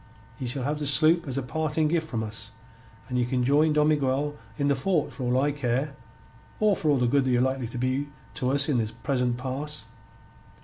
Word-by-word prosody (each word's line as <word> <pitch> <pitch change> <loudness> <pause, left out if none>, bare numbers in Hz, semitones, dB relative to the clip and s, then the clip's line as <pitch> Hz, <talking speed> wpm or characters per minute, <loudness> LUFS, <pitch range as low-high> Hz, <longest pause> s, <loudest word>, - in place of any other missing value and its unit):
Ye 130 - -3
shall 125 +2 -3
have 150 +3 -2
the 145 - -1
sloop 155 +3 +5
as 135 -1 -2
a 135 - -1
parting 155 +3 -1
gift 160 0 0
from 115 -7 -3
us, 110 +1 -4 0.6
and 125 -1 -1
ye - - +2
can 125 0 -1
join 150 +4 +3
Don 150 0 +3
Miguel 145 0 0 0.2
in 140 -1 0
the 140 - +3
fort 155 +2 0
for - - -9
all 125 +1 +2
I 145 +2 +2
care, 140 +1 -2 0.6
or 210 -2 +3
for 155 - -1
all 145 - +4
the 125 - +1
good 135 +2 +2
ye're 125 -1 +2
likely 130 -1 0
to 125 - -8
be 130 +3 -1 0.2
to 125 - -2
us 140 +1 +5
in 140 -6 +1
this 110 -1 -2
present 125 -3 -1
pass." 135 +4 -4
140 Hz, 220 wpm, -26 LUFS, 125-150 Hz, 0.6 s, sloop